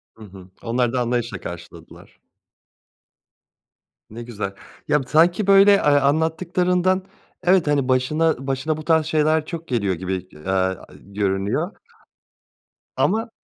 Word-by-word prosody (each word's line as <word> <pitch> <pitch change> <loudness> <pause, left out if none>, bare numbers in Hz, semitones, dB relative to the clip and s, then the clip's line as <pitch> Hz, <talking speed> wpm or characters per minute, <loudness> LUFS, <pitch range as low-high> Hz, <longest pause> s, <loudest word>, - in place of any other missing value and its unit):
Hı 110 - -14
hı. 95 -3 -13 0.2
Onlar 120 +1 0
da 130 - 0
anlayışla 120 -4 -2
karşıladılar. 85 -1 -11 1.9
Ne 115 +2 -8
güzel 105 -5 -5 0.3
ya 150 - +2
b - - -17
sanki 175 +7 +3
böyle, 195 +1 +7
eee, 200 - +4
anlattıklarından 170 +6 +1 0.4
evet, 180 -2 +3
hani, 145 -3 +1
başına 135 +2 0
başına 135 +3 -1
bu 155 - -7
tarz 160 -2 +3
şeyler 155 0 +1
çok 165 0 -7
geliyor 105 -6 0
gibi, 95 +2 -4 0.2
eee, 75 - -15
aaa, 95 -1 -1
görünüyor. 100 - -2 1.2
Ama 225 +4 0
140 Hz, 125 wpm, -21 LUFS, 105-165 Hz, 1.9 s, böyle